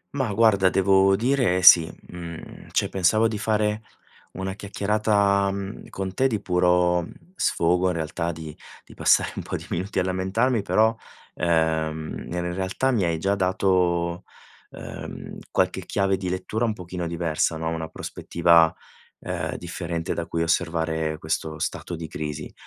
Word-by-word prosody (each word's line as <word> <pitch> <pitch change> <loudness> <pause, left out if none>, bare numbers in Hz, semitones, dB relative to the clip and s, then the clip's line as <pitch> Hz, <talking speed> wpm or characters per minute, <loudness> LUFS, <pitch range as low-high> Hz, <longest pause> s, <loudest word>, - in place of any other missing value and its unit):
Ma 130 -6 0
guarda, 100 -3 +4
devo 95 +1 +4
dire 115 -5 +1
sì. 85 -3 +8 0.2
Mhmm, 85 -2 -9
cioè, - - +1
pensavo 105 +4 +3
di 110 -2 -4
fare 105 0 0 0.5
una 95 +1 -4
chiacchierata, 100 0 +1
mhmm, 100 +2 -6
con 95 -1 -5
te 130 +6 +2
di 110 -5 -1
puro 90 -2 +2 0.3
sfogo, 90 - +1
in 90 - 0
realtà. 85 +1 -2
Di 80 -2 -8 0.3
di - - -15
passare - - +3
un - - -2
po' - - -5
di - - -6
minuti 95 +4 -3
a 95 - +3
lamentarmi 95 +6 0
però, 110 +3 +2 0.4
uhm, 80 -2 -1
in 90 0 -3
realtà 95 +8 -1
mi 115 -6 +1
hai 85 -1 0
già 95 +5 0
dato, 90 -2 +1 0.5
uhm, - - -8
qualche 95 0 0
chiave 95 -1 +1
di 95 -1 -4
lettura 105 +5 -2
un 110 - 0
pochino 90 -3 -5
diversa, 80 -1 -1
no, 80 0 -2
una 80 -1 -3
prospettiva, 85 0 +2 0.5
uhm, 80 -3 -3
differente 85 -1 -4
da 85 - -4
cui 85 0 -1
osservare 80 -2 0
questo 80 0 -3
stato 85 +2 -4
di 80 0 -6
crisi. 75 -1 -6
90 Hz, 150 wpm, -24 LUFS, 85-100 Hz, 0.5 s, sì